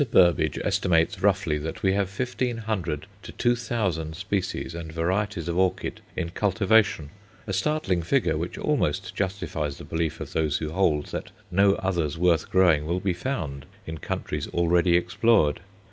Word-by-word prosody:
Burbidge 85 -3 +4
estimates 85 -2 +1
roughly 95 -6 +2
that 80 +8 -6
we 95 -1 +3
have 100 -1 0
fifteen 125 +2 -2
hundred 100 -10 -3 0.2
to - - -9
two 120 0 +2
thousand 95 -10 -2
species 95 -1 -2
and 85 -1 -6
varieties 90 +2 -1
of 85 +1 0
orchid 95 0 0
in 85 -2 -3
cultivation; 105 -5 +2 0.3
a 100 - -4
startling 95 - 0
figure, 85 - +1
which - - -4
almost - - 0
justifies 85 -7 -3
the - - -10
belief 80 -1 -2
of - - -7
those 80 -3 +1
who 75 -1 -4
hold 80 -5 +2
that - - -5 0.2
no 100 +2 +4
others 85 -6 -1
worth 85 -2 +2
growing 85 -5 +4
will 85 +2 0
be 95 -1 0
found 85 - -4 0.2
in 80 0 -6
countries - - -3
already 85 0 +3
explored. 95 -4 +2
90 Hz, 160 wpm, -26 LUFS, 80-100 Hz, 0.3 s, Burbidge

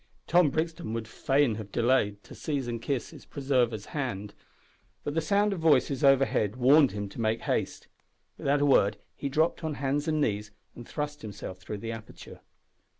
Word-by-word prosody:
Tom 175 -3 +4
Brixton 160 -6 -2
would 115 -1 -3
fain 135 +1 +1
have 100 -2 -11
delayed 115 -4 +1
to - - -13
seize 140 -5 -3
and 115 -1 -3
kiss 130 +1 -2
his - - -12
preserver's 125 -7 0
hand, 105 -8 -3 0.7
but 145 - -3
the 165 - +1
sound 205 +4 +2
of 185 - -4
voices 145 -3 +3
overhead 135 -6 +3
warned 135 +3 +5
him 105 -1 -4
to 105 - -7
make 110 +1 0
haste. - - -2 0.5
Without 140 +1 +1
a - - +4
word 105 -7 +4 0.2
he 140 - -3
dropped 155 +5 +1
on 155 -2 -2
hands 140 +2 -1
and 155 -1 +1
knees 105 -6 0 0.2
and 120 - -11
thrust 150 -1 -4
himself 100 -3 -7
through 105 +2 -6
the 115 +3 -5
aperture. 110 -1 -10
130 Hz, 180 wpm, -28 LUFS, 110-145 Hz, 0.7 s, warned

